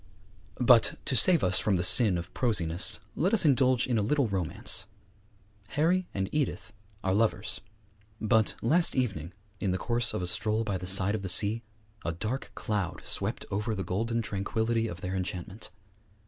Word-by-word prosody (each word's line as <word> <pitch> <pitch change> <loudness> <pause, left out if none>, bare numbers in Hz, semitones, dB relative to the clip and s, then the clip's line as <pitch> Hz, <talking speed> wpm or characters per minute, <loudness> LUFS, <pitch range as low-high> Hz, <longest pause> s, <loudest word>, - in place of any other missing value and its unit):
But, 120 -2 +5
to 130 - +1
save 170 +6 +5
us 95 0 +3
from 105 - +1
the 90 - 0
sin 100 0 +6
of 85 - -7
prosiness, 90 -8 +1 0.2
let 190 +7 +2
us 200 - +2
indulge 130 -3 +3
in 120 -4 0
a - - +1
little 140 +5 +1
romance. 95 -6 0 0.9
Harry 175 +4 +2
and 95 -1 -2
Edith 135 -7 -2 0.3
are 95 - +1
lovers; 105 0 0 0.6
but 110 0 +2
last 165 +9 +2
evening, 95 - -2 0.3
in 100 - -1
the 90 - 0
course 120 +4 -1
of 90 - -2
a - - -1
stroll 110 +5 0
by 100 -4 -3
the 90 - -7
side 95 +1 +2
of 110 - -2
the 95 - -4
sea, 105 +5 +3 0.4
a 85 - -2
dark 110 +10 -4
cloud 100 -6 -3
swept - - -2
over 105 +3 -2
the 95 - -3
golden 115 +5 -2
tranquillity 110 +3 -1
of 85 -2 -8
their 95 -1 -4
enchantment. 95 +2 -5
105 Hz, 175 wpm, -28 LUFS, 95-120 Hz, 0.9 s, sin